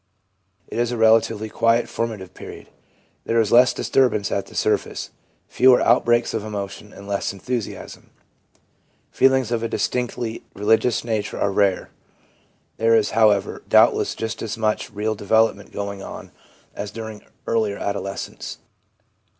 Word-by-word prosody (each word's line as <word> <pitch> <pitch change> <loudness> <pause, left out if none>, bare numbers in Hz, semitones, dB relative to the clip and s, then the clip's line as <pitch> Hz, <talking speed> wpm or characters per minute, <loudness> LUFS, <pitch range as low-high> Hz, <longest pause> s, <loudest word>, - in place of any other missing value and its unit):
It - - -5
is 120 0 +1
a 120 - -3
relatively 110 -1 +3
quiet, 115 +2 +2
formative 105 -5 -4
period. - - -11 0.6
There 115 - +1
is 110 -2 +1
less 125 +2 +6
disturbance 125 -6 +1
at 100 - -2
the - - -14
surface, - - -1 0.4
fewer 130 0 +5
outbreaks 120 0 +3
of 110 - -2
emotion, 105 -1 -6
and 100 - -12
less 100 -1 -1
enthusiasm. 110 +3 -6 1.0
Feelings 130 -3 +3
of 115 -2 0
a 115 - -1
distinctively 120 -1 -2
religious 110 +4 +2
nature 110 -3 -3
are 100 - +1
rare. 100 -1 +1 0.9
There 115 0 +3
is, 110 -2 +2
however, 105 -3 +2
doubtless - - +4
just 110 0 -4
as 115 0 -4
much 110 -1 -1
real 105 +1 -2
development 105 0 +1
going 100 -1 -5
on - - -9 0.4
as 100 0 -5
during 110 0 -8 0.2
earlier 110 -3 0
adolescence. 100 -1 -5
110 Hz, 135 wpm, -22 LUFS, 100-115 Hz, 1.0 s, less